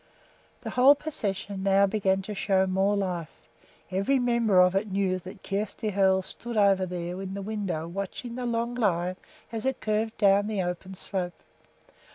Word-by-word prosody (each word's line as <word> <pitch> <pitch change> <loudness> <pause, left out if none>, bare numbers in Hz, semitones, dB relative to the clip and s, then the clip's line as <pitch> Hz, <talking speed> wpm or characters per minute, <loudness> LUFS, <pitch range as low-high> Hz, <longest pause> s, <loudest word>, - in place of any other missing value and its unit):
The - - -5
whole 265 +3 +6
procession 205 -10 -4
now 195 0 +4
began 195 -1 +1
to 210 - -5
show 195 -1 +2
more 190 +2 +1
life. 180 -5 -2 0.6
Every 195 +9 +2
member 235 -6 +3
of 180 0 +6
it 195 +1 -1
knew 190 -1 +1
that 185 +2 -11
Kjersti 210 +2 -2
Hoel 190 -1 +3
stood 235 +4 -6
over 195 -2 +4
there 180 +1 -4
in 190 0 -5
the 200 - -4
window 195 -6 -3
watching 200 +6 -5
the 245 0 -3
long 235 0 -1
line 185 -6 0 0.3
as 225 -1 -4
it 265 -1 -1
curved 220 +1 -1
down 200 0 +4
the 210 -3 -1
open 180 +2 -5
slope. 180 -2 -4
195 Hz, 170 wpm, -27 LUFS, 185-215 Hz, 0.6 s, whole